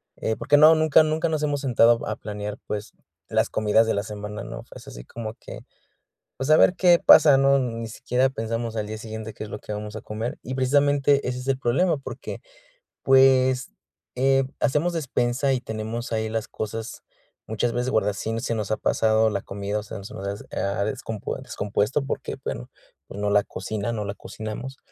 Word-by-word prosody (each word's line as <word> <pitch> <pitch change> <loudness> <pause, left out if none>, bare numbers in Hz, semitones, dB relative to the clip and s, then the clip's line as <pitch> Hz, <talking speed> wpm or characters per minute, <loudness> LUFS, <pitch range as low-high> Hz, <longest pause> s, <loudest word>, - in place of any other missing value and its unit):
eh, 110 - -2
porque 145 - +2
no, 155 +2 +8
nunca 155 0 +5
nunca 155 +2 0
nos 155 -2 -1
hemos 145 -1 0
sentado 120 -3 +4
a - - -2
planear, 105 0 -6
pues, 105 0 -5 0.3
las - - +1
comidas 110 +1 +3
de - - +1
la 100 - -1
semana, 105 0 -6
¿no?, - - -7
es - - -12
así - - -9
como 110 -2 -6
que, - - -10 0.8
pues, 135 - -3
a 155 - +8
ver 180 - +5
qué 175 -2 +5
pasa, 150 -3 +8
¿no?, 135 0 +4
ni 115 -3 -3
siquiera 130 +2 0
pensamos 115 -1 -3
al 105 -1 -2
día 110 - -5
siguiente 110 0 -7
qué - - -8
es 105 - -10
lo - - -5
que 105 - -8
vamos 105 0 -6
a - - -5
comer 110 +3 -5
y, 130 - -5
precisamente, 140 +1 +2
ese 125 0 -3
es 125 - -8
el 135 - +1
problema 150 +8 +2
porque, 135 - -7 0.6
pues, 130 -1 +4 0.4
eh, 135 +1 +3 0.2
hacemos 150 +5 +1
despensa 135 -3 0
y 125 - -1
tenemos 110 +2 -5
ahí 110 0 -1
las 110 0 -3
cosas, 110 +1 -6 0.4
muchas 110 +2 -1
veces 125 +2 -1
guarda 105 -3 +1
sin 110 +3 -3
se 115 - -2
nos 105 -2 -3
ha 110 - +1
pasado 110 0 +2
la 100 -2 -2
comida, 100 +1 -4
o - - -7
sean, 100 -1 -8
se 100 - -9
nos 100 - -5
has 100 +1 -4
ha, 100 0 -1
descompue 110 0 -4
descompuesto 105 +6 -1
porque, 135 - -4
bueno, - - -5 0.4
pues, 100 - -8
no 105 - +1
la 105 0 +4
cocina 105 +4 -4
no 105 -2 -3
la 100 0 -4
cocinamos. 110 +7 -7
115 Hz, 200 wpm, -24 LUFS, 105-135 Hz, 0.8 s, no